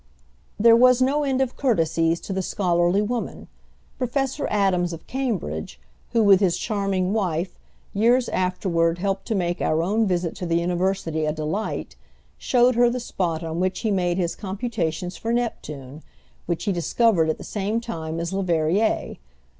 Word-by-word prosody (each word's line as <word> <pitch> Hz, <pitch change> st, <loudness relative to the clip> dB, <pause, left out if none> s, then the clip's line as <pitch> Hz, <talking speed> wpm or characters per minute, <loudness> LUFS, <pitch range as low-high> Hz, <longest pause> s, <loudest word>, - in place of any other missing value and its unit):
There 230 Hz, +2 st, +7 dB
was 250 Hz, +1 st, +6 dB
no 275 Hz, +3 st, +2 dB
end 265 Hz, -2 st, 0 dB
of 260 Hz, -2 st, -1 dB
courtesies 165 Hz, -, +1 dB
to 195 Hz, -, -5 dB
the 190 Hz, -, -1 dB
scholarly 175 Hz, +1 st, +1 dB
woman. 230 Hz, -2 st, -4 dB, 0.5 s
Professor 270 Hz, +3 st, -1 dB
Adams, 185 Hz, -4 st, +1 dB
of 165 Hz, -, -9 dB
Cambridge, 180 Hz, -, -3 dB, 0.3 s
who, 230 Hz, -, +2 dB
with 200 Hz, -2 st, +6 dB
his 185 Hz, -4 st, +2 dB
charming 195 Hz, -3 st, -1 dB
wife, 180 Hz, -4 st, -1 dB, 0.3 s
years 240 Hz, +4 st, +3 dB
afterward 175 Hz, -2 st, 0 dB
helped 195 Hz, +1 st, -2 dB
to 225 Hz, -, 0 dB
make 175 Hz, -2 st, -1 dB
our 155 Hz, +1 st, +1 dB
own 215 Hz, +4 st, +1 dB
visit 175 Hz, -2 st, 0 dB
to 180 Hz, -, -4 dB
the 165 Hz, -, +1 dB
University 175 Hz, -2 st, 0 dB
a -, -, +1 dB
delight, 155 Hz, -, -3 dB, 0.4 s
showed 250 Hz, 0 st, +3 dB
her 240 Hz, 0 st, +4 dB
the 250 Hz, +1 st, -2 dB
spot 175 Hz, -8 st, -2 dB
on 165 Hz, +1 st, -3 dB
which 185 Hz, +1 st, -1 dB
he 220 Hz, -2 st, 0 dB
made 180 Hz, -2 st, +1 dB
his 175 Hz, -2 st, -1 dB
computations 185 Hz, -5 st, -3 dB
for 225 Hz, -, -3 dB
Neptune, 155 Hz, -, -4 dB, 0.5 s
which 170 Hz, -, -2 dB
he 205 Hz, -, 0 dB
discovered 175 Hz, -1 st, +2 dB
at 155 Hz, -, 0 dB
the -, -, -10 dB
same 210 Hz, +2 st, -2 dB
time 165 Hz, -8 st, -5 dB
as 170 Hz, +2 st, -3 dB
Leverrier. 185 Hz, +2 st, 0 dB
190 Hz, 160 wpm, -23 LUFS, 170-225 Hz, 0.5 s, There